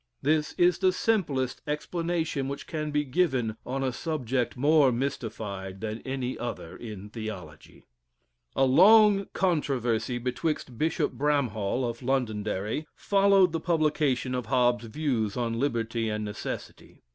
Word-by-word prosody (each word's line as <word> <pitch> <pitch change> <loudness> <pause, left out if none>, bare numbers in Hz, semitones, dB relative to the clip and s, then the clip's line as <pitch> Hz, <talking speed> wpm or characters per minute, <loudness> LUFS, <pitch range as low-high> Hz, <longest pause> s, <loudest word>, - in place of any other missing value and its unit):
This 150 +1 +1
is 175 -1 +3
the 185 -1 +4
simplest 160 - 0
explanation 160 -1 -2
which 140 0 -5
can 155 -1 -3
be 150 0 +1
given 130 -6 0
on 135 +1 -2
a 130 -2 -1
subject 130 -5 -2
more 145 0 +5
mystified 110 -7 -4
than 110 +2 -4
any 130 -1 -3
other 120 -1 -5
in 105 -3 -8
theology. 95 -9 -8 0.7
A 135 - +4
long 200 +8 +6
controversy 130 - 0
betwixt 125 +2 -2
Bishop 160 +1 +1
Bramhall, 125 -5 0
of 115 +1 -5
Londonderry, 115 0 -1
followed 195 -2 +4
the 165 - -1
publication 150 -7 +1
of 125 -3 -3
Hobbes's 120 -2 +2
views 115 -6 -1
on 115 -1 -1
Liberty 115 -4 -1
and 105 0 -2
Necessity. 105 0 -7
130 Hz, 130 wpm, -27 LUFS, 115-155 Hz, 0.7 s, long